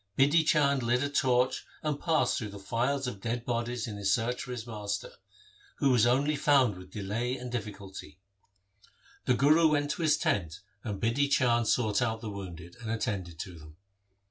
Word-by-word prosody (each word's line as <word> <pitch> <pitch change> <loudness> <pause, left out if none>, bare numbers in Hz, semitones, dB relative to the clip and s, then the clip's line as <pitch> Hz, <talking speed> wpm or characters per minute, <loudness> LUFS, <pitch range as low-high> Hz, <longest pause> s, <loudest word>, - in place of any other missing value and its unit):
Bidhi 145 +4 +5
Chand 140 -3 +3
lit 120 +2 +1
a 145 - -1
torch 130 -2 +2 0.2
and 150 -2 -1
passed 165 -2 +1
through 105 -4 -6
files 125 +7 -1
of 115 -6 -5
dead 120 +2 -3
bodies 120 0 -2
in 105 -3 -6
his 100 -1 0
search 120 +3 0
for 125 - -6
his 120 -2 -5
master, 105 -4 -4 0.6
who 135 - +2
was 120 -2 +4
only 140 +5 +2
found 140 -6 +3
with 90 0 -12
delay 110 +6 -3
and 125 -1 -7
difficulty. 100 -8 -7 1.1
The 125 - +3
Guru 150 +6 +5
went 145 -1 +1
to - - -4
his 155 -2 +3
tent 100 - -1 0.2
and 105 -4 -4
Bidhi 125 +6 +1
Chand 120 -4 +3
sought 110 -2 +2
out 110 -2 0
the 110 -2 -6
wounded 85 -3 -8
and 115 - -6
attended 100 -7 -3
to 90 -4 -8
them. 75 +1 -14
120 Hz, 180 wpm, -29 LUFS, 100-135 Hz, 1.1 s, Bidhi